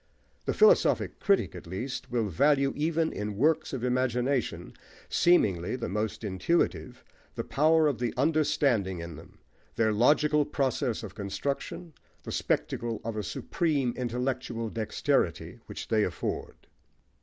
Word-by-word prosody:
The - - -1
philosophic 445 +3 +4
critic, 200 -1 +2
at 90 -2 -10
least, 120 +10 -5
will 120 -3 0
value, 140 - +2
even 160 +2 0
in 105 -1 -4
works 155 +6 +2
of 130 -3 -4
imagination, 125 0 0 0.4
seemingly 105 - +3
the 130 - -4
most 105 +3 -3
intuitive, 95 - -1 0.3
the - - -3
power 155 +2 +3
of 135 -6 -1
the 120 -2 0
understanding 140 - +2
in 85 -1 -7
them, 80 +3 -14 0.4
their 110 -1 +2
logical 150 +6 +4
process 135 -4 -1
of 100 -4 -7
construction, 140 - -4 0.3
the - - -6
spectacle 115 -2 -1
of 115 -1 -4
a 105 - -1
supreme 140 - -1
intellectual 120 -2 -3
dexterity 110 -2 -1
which - - -7
they - - +3
afford. - - -3
125 Hz, 130 wpm, -28 LUFS, 105-150 Hz, 0.4 s, philosophic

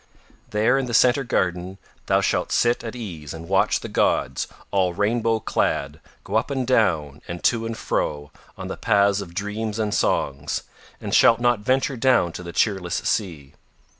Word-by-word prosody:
There 110 +6 +2
in 130 - -2
the 120 - -1
Centre 125 +3 +4
Garden 95 -4 -1 0.3
thou - - +3
shalt - - 0
sit 120 0 +2
at 115 +1 -6
ease 85 -11 -7
and 80 +1 -9
watch 95 +1 +2
the - - -6
gods 65 0 0 0.2
all 90 -3 +1
rainbow 115 +2 +1
clad 75 -8 -1 0.2
go 105 - -1
up 110 - -1
and 135 -2 -1
down 80 - +1
and 85 0 -6
to 115 -1 +2
and 115 -1 -5
fro 75 -1 -2 0.3
on - - -6
the - - -5
paths 100 -2 +2
of 85 -3 -10
dreams 105 +2 -3
and 105 -2 -1
songs, 70 -1 -1 0.4
and - - -5
shalt 115 - +6
not 120 -2 +2
venture 130 +4 0
down 120 -8 +3
to 90 - -8
the 85 -1 -7
cheerless 95 -3 0
sea. 80 -9 -2
105 Hz, 175 wpm, -23 LUFS, 85-115 Hz, 0.4 s, shalt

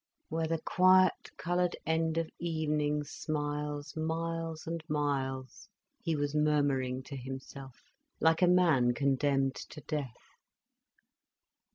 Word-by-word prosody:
"'Where 160 0 -1
the 165 +1 0
quiet 185 +2 +4
coloured 175 0 0
end 160 0 +1
of 165 -1 0
evening 150 -3 0
smiles 145 0 -3
Miles 165 0 -3
and 165 0 -4
miles—'" 135 -2 -2 0.3
he 165 -3 -1
was 145 0 -1
murmuring 145 -4 +1
to 140 - -8
himself, 135 0 -8 0.4
like 160 +1 +3
a 180 - +6
man 160 -9 +4
condemned 135 -1 +2
to 155 - -9
death. 145 -6 -4
150 Hz, 110 wpm, -31 LUFS, 140-165 Hz, 0.4 s, a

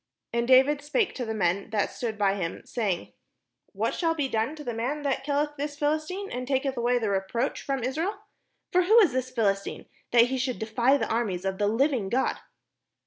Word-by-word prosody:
And 235 0 0
David 265 +3 +5
spake 370 +9 0
to 250 - -4
the 220 - -3
men 195 -1 0
that 210 -2 0
stood 225 -3 -4
by 200 -2 +2
him, 180 -4 -4
say 220 -5 -1
ing: 175 - -5 0.6
"What - - -1
shall 330 -2 0
be 290 -4 0
done 230 +4 -1
to 300 - -9
the 240 - -3
man 260 +7 -2
that 270 -1 -1
killeth 295 +1 -1
this 290 +1 -4
Philistine, 310 +7 -1
and 250 0 -4
taketh 270 0 0
away 245 0 +2
the 220 -4 -1
reproach 195 +6 -1
from 270 -3 -2
Israel? 320 - -1 0.6
for 365 - +4
who 430 +6 +6
is 345 - +3
this 255 0 -1
Philistine, 200 -5 -1 0.2
that 235 -1 +6
he 260 +1 -2
should 255 -1 -1
defy 235 +5 +2
the - - -2
armies 200 -6 -1
of 190 0 -2
the 205 - +2
living 235 -2 +1
God?" 255 +6 +1
255 Hz, 205 wpm, -27 LUFS, 220-290 Hz, 0.6 s, who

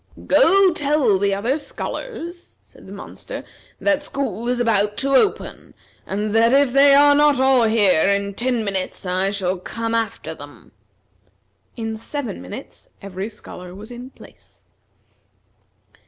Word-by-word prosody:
"Go 390 -6 +5
tell 285 - +2
the 200 0 +1
other 240 +9 -1
scholars," 345 0 -7
said - - -17
the - - -11
monster, - - -8 0.4
"that 295 -1 +1
school 245 -6 -3
is 250 0 0
about 210 -3 +1
to 275 0 -1
open, 400 +10 0 0.3
and 210 +2 -2
that 230 +2 +4
if 275 -2 +3
they 275 0 +6
are 290 0 +6
not 290 -2 +4
all 265 -3 +4
here 205 -6 +3
in 200 0 0
ten 240 +1 -1
minutes, 190 -1 -3
I 185 +1 0
shall 190 -2 -2
come 230 +4 -4
after 230 -1 -2
them." - - -14 1.1
In 225 -1 -4
seven 235 - -5
minutes 90 - -10
every 195 +1 -6
scholar 180 -4 -10
was 215 +4 -10
in 245 +1 -9
place. - - -18
230 Hz, 140 wpm, -21 LUFS, 200-280 Hz, 1.1 s, they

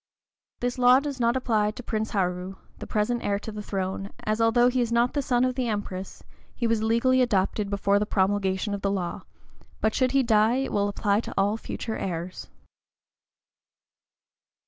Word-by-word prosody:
This 245 +1 -2
law 250 +1 +7
does 280 -2 -5
not 235 0 +2
apply 220 -5 +1
to 235 +4 -8
Prince 220 -1 -2
Haru, 180 -1 -2 0.2
the - - -7
present 220 +3 0
heir 200 0 0
to 220 - -7
the 210 0 -6
throne, 195 -1 -3
as, 215 +1 0
although 235 +2 +4
he 250 0 +1
is 235 -1 -1
not 235 +1 +2
the 290 - 0
son 250 -2 +2
of 255 - 0
the 255 -1 -2
Empress, 200 -3 -5 0.3
he 240 - -2
was 225 -1 +1
legally 235 +4 +3
adopted 205 -3 +1
before 200 0 +2
the 210 - -1
promulgation 195 0 0
of 200 - -4
the 200 - 0
law; 185 -3 -3 0.6
but 220 0 +1
should 255 0 +1
he 275 -1 +4
die, 220 0 +3
it 270 +1 -1
will 205 0 +1
apply 205 0 +1
to - - -6
all 200 +2 +2
future 225 0 -5
heirs. 175 0 -5
215 Hz, 185 wpm, -26 LUFS, 200-245 Hz, 0.6 s, law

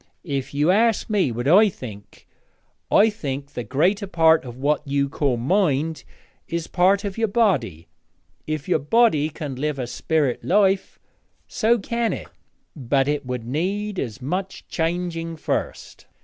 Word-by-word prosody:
If 140 -5 -3
you 150 +5 +3
ask 225 +2 +2
me 195 - +2
what 120 +3 -3
I 205 +7 +6
think, 105 - -11 0.6
I 220 +2 +5
think 140 -8 -5
the 120 - -4
greater 185 - +1
part 165 -3 +4
of 120 -1 -8
what 145 +3 +1
you 140 0 +1
call 135 -2 0
mind 155 - 0 0.4
is 170 -1 -3
part 190 +2 +2
of 200 +1 -4
your 225 - +2
body. 145 - 0 0.6
If 155 -2 -3
your 180 - +2
body 155 - +3
can 145 -4 -6
live 150 +1 -2
a 130 - -2
spirit 145 +1 -1
life, 195 0 +2 0.5
so 235 +2 +2
can 235 +2 -1
it; - - -7 0.5
but 135 -1 0
it 145 -2 -1
would 125 -2 -4
need 190 - -2
as 125 +1 -5
much 185 +7 -4
changing 165 0 -2
first.' 155 - -4
160 Hz, 150 wpm, -23 LUFS, 135-195 Hz, 0.6 s, I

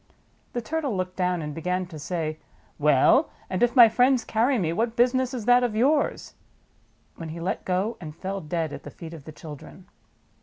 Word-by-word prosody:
The 240 - -2
Turtle 290 -7 -2
looked 185 0 -3
down 180 -2 0
and 150 0 -5
began 180 +4 -2
to 165 -3 -10
say, 155 0 -3 0.4
Wen, 150 - +5 0.3
and 185 - -1
if 240 +1 +3
my 240 -3 +10
friends 245 +2 +3
carry 245 +4 +2
me, 165 -6 0
what 230 +5 -1
business 255 +1 +2
is 245 -5 -5
that 245 +1 +5
of 235 -3 -1
yours?" 285 +6 +1 0.8
when 165 -1 -7
he 165 +2 -7
let 180 +3 -3
go, 190 +5 -1
and 155 -3 -8
fell 195 +3 -4
dead 160 0 -3
at - - -7
the - - -9
feet 165 0 -10
of 155 -4 -11
the 155 - -8
children. 145 - -11
185 Hz, 195 wpm, -25 LUFS, 160-240 Hz, 0.8 s, my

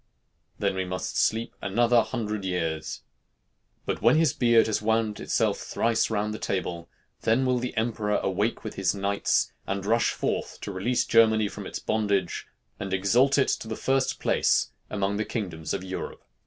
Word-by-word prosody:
"Then - - 0
we 95 - -1
must 90 0 -4
sleep 115 +1 +1
another 120 +4 +3
hundred 110 -4 -3
years." 80 -4 -2 0.8
But - - -2
when 115 +6 +5
his 155 -4 +3
beard 120 -2 +4
has 110 -2 -1
wound 110 -1 0
itself - - 0
thrice 115 0 0
round 105 -1 -1
the 110 - -6
table, 85 -3 -3 0.3
then 115 +4 +2
will 125 -1 +2
the 125 +1 -4
emperor 110 -2 0
awake 100 +4 -1
with 110 - -5
his 95 0 0
knights, 100 0 +1
and 100 0 -2
rush 115 +2 +3
forth - - -2
to - - -5
release 115 +7 0
Germany 110 -2 +4
from - - -7
its - - -5
bondage, 100 -4 -1 0.3
and 95 - -4
exalt 120 +9 +3
it 135 - +3
to - - -2
the 110 - -3
first 135 0 0
place - - +2 0.2
among 100 -1 -1
the 110 - 0
kingdoms 90 -9 -4
of - - -2
Europe. 95 0 -6
110 Hz, 170 wpm, -26 LUFS, 95-115 Hz, 0.8 s, when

